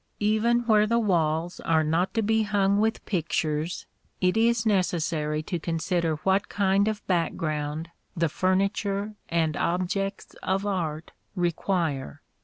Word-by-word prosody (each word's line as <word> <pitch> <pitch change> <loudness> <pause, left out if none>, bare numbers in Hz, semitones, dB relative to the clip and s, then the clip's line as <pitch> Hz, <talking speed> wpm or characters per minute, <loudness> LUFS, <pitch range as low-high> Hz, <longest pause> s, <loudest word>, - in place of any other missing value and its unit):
Even 220 +3 +2
where 215 -3 +3
the 230 +2 +2
walls 170 -5 0
are 160 -1 +2
not 165 +4 +1
to 225 - +2
be 220 +1 +2
hung 200 -1 +2
with 220 +1 0
pictures, 160 -2 -1 0.3
it 180 +1 +2
is 230 0 +2
necessary 165 -6 0
to 175 +1 -3
consider 165 0 -1
what 195 +1 +2
kind 200 0 +2
of 215 -1 -3
background 155 -2 -1 0.3
the 165 0 +2
furniture 195 +4 0 0.2
and 160 -2 +1
objects 185 +4 -2
of 195 +1 -1
art 165 -6 -2 0.2
require. 170 - -1
185 Hz, 130 wpm, -26 LUFS, 160-205 Hz, 0.3 s, where